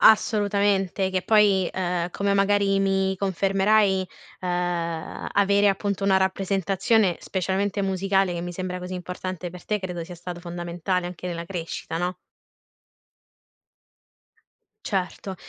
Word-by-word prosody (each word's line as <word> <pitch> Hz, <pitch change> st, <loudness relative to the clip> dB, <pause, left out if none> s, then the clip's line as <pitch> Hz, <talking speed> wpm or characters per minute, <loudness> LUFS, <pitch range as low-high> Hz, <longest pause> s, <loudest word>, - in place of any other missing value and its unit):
Assolutamente 205 Hz, -3 st, +3 dB
che 185 Hz, -1 st, -1 dB
poi 205 Hz, -4 st, +4 dB
ehm, 175 Hz, -1 st, -1 dB
come 200 Hz, +1 st, 0 dB
magari 200 Hz, 0 st, +3 dB
mi 190 Hz, 0 st, +1 dB
confermerai 195 Hz, +1 st, +2 dB, 0.3 s
ehm, 175 Hz, -2 st, -2 dB
avere 200 Hz, 0 st, +4 dB
appunto 200 Hz, 0 st, -1 dB
una 190 Hz, -1 st, +4 dB
rappresentazione, 195 Hz, +1 st, +1 dB
specialmente 195 Hz, +2 st, -1 dB
musicale 195 Hz, -1 st, +1 dB
che 170 Hz, -, -3 dB
mi 175 Hz, 0 st, -5 dB
sembra 180 Hz, 0 st, -4 dB
così 180 Hz, +1 st, -7 dB
importante 180 Hz, 0 st, -5 dB
per 180 Hz, +1 st, -11 dB
te 210 Hz, -1 st, 0 dB
credo 180 Hz, -3 st, -5 dB
sia 180 Hz, -, -9 dB
stato 175 Hz, +1 st, -7 dB
fondamentale 175 Hz, +1 st, -2 dB
anche 180 Hz, 0 st, -7 dB
nella 170 Hz, -1 st, -4 dB
crescita, 165 Hz, -2 st, -5 dB
no? 180 Hz, +1 st, -1 dB, 2.7 s
Certo. 190 Hz, 0 st, -2 dB
190 Hz, 120 wpm, -25 LUFS, 180-195 Hz, 2.7 s, poi